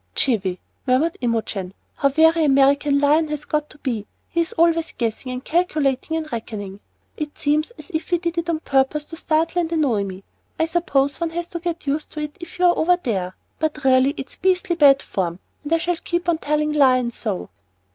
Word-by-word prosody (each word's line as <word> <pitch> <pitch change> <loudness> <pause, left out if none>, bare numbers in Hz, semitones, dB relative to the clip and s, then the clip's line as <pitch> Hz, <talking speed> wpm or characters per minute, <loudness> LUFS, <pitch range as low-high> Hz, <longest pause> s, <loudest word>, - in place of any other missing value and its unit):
"Jiffy!" 195 -8 +1 0.3
murmured 280 +7 +2
Imogen. 220 -5 -2 0.2
"How 280 - +3
very 320 +3 +4
American 280 0 +4
Lion 295 +3 +3
has 300 -1 -4
got 300 0 -1
to - - -13
be. 235 -8 -3 0.2
He's 335 -1 0
always 330 0 +2
'guessing' 235 +2 -3
and 255 +1 -6
'calculating' 310 -3 0
and 310 -2 -5
'reckoning.' 205 -4 -5 0.4
It 300 -1 -5
seems 300 +2 +1
as - - -12
if 315 -1 -3
he 350 - +3
did 340 0 -2
it 335 0 -4
on 320 -2 0
purpose 275 +2 +1
to 325 - -9
startle 330 +1 +1
and 330 -1 -3
annoy 275 -11 +1
me. 190 0 -7 0.3
I 320 - +2
suppose 285 -5 0
one 335 -1 -1
has 345 +1 -3
got - - -27
to 340 - -4
get 340 -1 -4
used 290 +2 -1
to 305 - -4
it 300 -1 -5
if 345 +1 -9
you're 360 -1 +4
over 355 +2 +4
there, 190 - -3 0.2
but 305 -2 -2
really 265 +2 +4
it's 270 - -7
beastly 365 -1 +1
bad 280 -4 +6
form, 175 -3 -2 0.3
and 295 - -7
I 330 - +5
shall 345 +1 -1
keep 345 +1 -3
on 335 -2 +2
telling 300 0 0
Lion 255 -4 +4
so." 215 -5 -4
300 Hz, 200 wpm, -22 LUFS, 260-330 Hz, 0.4 s, bad